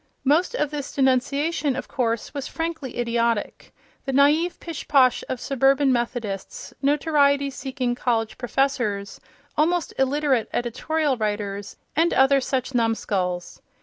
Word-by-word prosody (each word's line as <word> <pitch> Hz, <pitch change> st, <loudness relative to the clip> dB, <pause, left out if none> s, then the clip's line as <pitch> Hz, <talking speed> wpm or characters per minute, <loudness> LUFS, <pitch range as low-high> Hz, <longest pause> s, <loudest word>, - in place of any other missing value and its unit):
Most 315 Hz, -, +2 dB
of 300 Hz, -, -1 dB
this 290 Hz, -2 st, -5 dB
denunciation, 280 Hz, +2 st, +1 dB
of 260 Hz, -, -5 dB
course, 230 Hz, -3 st, -2 dB
was 280 Hz, -1 st, -4 dB
frankly 325 Hz, -6 st, -4 dB
idiotic—the 235 Hz, +2 st, -2 dB
naïve 295 Hz, +6 st, +3 dB
pishposh 280 Hz, -6 st, +2 dB
of 255 Hz, -, -3 dB
suburban 270 Hz, +1 st, +3 dB
Methodists, 235 Hz, -5 st, -4 dB
notoriety 280 Hz, -1 st, +2 dB
seeking 260 Hz, -2 st, -3 dB
college 230 Hz, -2 st, -1 dB
professors, 245 Hz, -6 st, -1 dB, 0.3 s
almost 335 Hz, +2 st, +1 dB
illiterate 265 Hz, -3 st, +1 dB
editorial 280 Hz, +4 st, -1 dB
writers, 205 Hz, -2 st, -3 dB, 0.2 s
and 330 Hz, +3 st, +2 dB
other 270 Hz, +1 st, +5 dB
such 260 Hz, 0 st, -2 dB
numskulls. 200 Hz, -6 st, -1 dB
265 Hz, 115 wpm, -24 LUFS, 235-290 Hz, 0.3 s, other